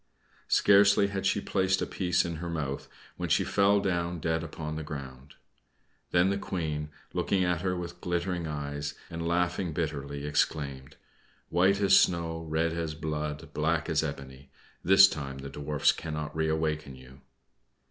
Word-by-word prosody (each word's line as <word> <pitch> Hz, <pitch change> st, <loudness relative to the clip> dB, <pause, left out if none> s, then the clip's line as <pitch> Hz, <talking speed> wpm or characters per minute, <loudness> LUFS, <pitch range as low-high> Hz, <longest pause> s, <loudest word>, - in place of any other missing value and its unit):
Scarcely 100 Hz, 0 st, +5 dB
had 95 Hz, -1 st, -1 dB
she 105 Hz, -, +2 dB
placed 95 Hz, -1 st, +1 dB
a -, -, 0 dB
piece 90 Hz, -1 st, 0 dB
in 85 Hz, -2 st, -4 dB
her 85 Hz, +2 st, -5 dB
mouth 70 Hz, -4 st, -3 dB, 0.3 s
when -, -, -3 dB
she -, -, +3 dB
fell 100 Hz, 0 st, +3 dB
down 90 Hz, -3 st, -1 dB
dead 80 Hz, +1 st, -1 dB
upon 80 Hz, -1 st, -5 dB
the 80 Hz, -, -4 dB
ground. 70 Hz, -2 st, -8 dB, 0.7 s
Then 90 Hz, +2 st, +3 dB
the 100 Hz, -, -1 dB
Queen, 75 Hz, -6 st, -3 dB, 0.2 s
looking 95 Hz, -2 st, +1 dB
at 90 Hz, -2 st, 0 dB
her 90 Hz, -1 st, 0 dB
with 90 Hz, 0 st, -7 dB
glittering 90 Hz, -1 st, -2 dB
eyes, 75 Hz, -1 st, -4 dB, 0.2 s
and 85 Hz, 0 st, -4 dB
laughing 85 Hz, 0 st, 0 dB
bitterly, 70 Hz, -3 st, -3 dB
exclaimed, 70 Hz, -3 st, -1 dB, 0.5 s
"White 95 Hz, +3 st, +3 dB
as 95 Hz, -1 st, +6 dB
snow, 85 Hz, -2 st, 0 dB
red 80 Hz, +1 st, +1 dB
as 80 Hz, -2 st, -3 dB
blood, 75 Hz, 0 st, -4 dB
black 80 Hz, +1 st, 0 dB
as 80 Hz, -2 st, +2 dB
ebony! 70 Hz, -2 st, -7 dB, 0.3 s
This 95 Hz, +2 st, +8 dB
time 70 Hz, -7 st, -5 dB
the 70 Hz, +1 st, -7 dB
Dwarfs 75 Hz, +1 st, +2 dB
cannot 75 Hz, -2 st, -5 dB
reawaken 80 Hz, -3 st, -1 dB
you." 65 Hz, +1 st, -15 dB
80 Hz, 155 wpm, -29 LUFS, 75-90 Hz, 0.7 s, This